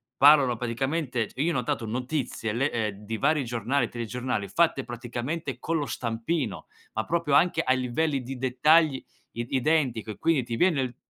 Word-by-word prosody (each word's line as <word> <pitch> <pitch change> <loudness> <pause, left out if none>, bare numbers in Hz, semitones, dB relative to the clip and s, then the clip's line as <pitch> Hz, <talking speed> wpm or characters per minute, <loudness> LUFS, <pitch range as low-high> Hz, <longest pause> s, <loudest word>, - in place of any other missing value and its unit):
parlano 140 -4 +6
praticamente 125 +1 -1
c - - -19
io 155 +5 +1
ho - - 0
notato 120 -2 -1
notizie, 125 -2 -3
le 135 +5 +1
ehm, 110 -3 -1
di 110 +2 -4
vari 145 +3 +2
giornali, 120 +4 -1
telegiornali, 120 -2 -3
fatte 165 -5 +2
praticamente 125 +4 -4
con 165 +5 -1
lo 145 -3 -2
stampino, 115 - -3 0.3
ma 110 - -2
proprio 170 -4 0
anche 170 +5 +4
a 130 - +3
livelli 130 +3 0
di 130 +1 -6
dettagli 135 +3 +3 0.3
id 120 +1 -6
identico 130 -6 +1
e - - -9
quindi 160 -6 +2
ti 115 -1 -4
viene 135 -7 +1
130 Hz, 170 wpm, -27 LUFS, 120-150 Hz, 0.3 s, parlano